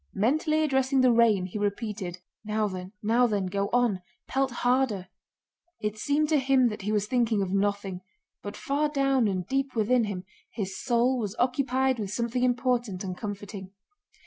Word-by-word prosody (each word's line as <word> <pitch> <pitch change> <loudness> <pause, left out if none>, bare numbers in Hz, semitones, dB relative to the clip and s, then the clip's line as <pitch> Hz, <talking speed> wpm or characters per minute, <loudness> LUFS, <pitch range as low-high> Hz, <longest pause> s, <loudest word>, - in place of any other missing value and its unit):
Mentally 310 - +2
addressing 265 -2 +2
the 255 -1 +5
rain, 225 -5 +4
he 190 +3 -5
repeated: 205 -3 -3 0.3
"Now 215 0 0
then, 185 -1 -6
now 235 +3 +4
then, 205 -4 -1
go 200 +2 -1
on! 240 -6 +2 0.3
Pelt 270 0 +1 0.2
harder!" 245 -7 +1 0.7
It 210 0 -2
seemed 290 +7 +1
to 310 -2 +4
him 265 -2 +3
that 210 - -6
he 210 +2 -2
was 210 -1 +1
thinking 230 -3 +1
of 185 - -4
nothing, 200 -2 -1 0.4
but - - -7
far 295 +2 0
down 275 -4 +2
and 185 -3 -2
deep 270 +4 -1
within 230 +2 +3
him 195 -3 -4 0.3
his 195 -4 -4
soul 245 +1 +2
was 210 -2 -3
occupied 260 0 +1
with 205 -3 -3
something 235 +3 -1
important 245 -6 0
and 185 -2 -4
comforting. 200 -1 -7
225 Hz, 170 wpm, -27 LUFS, 200-260 Hz, 0.7 s, the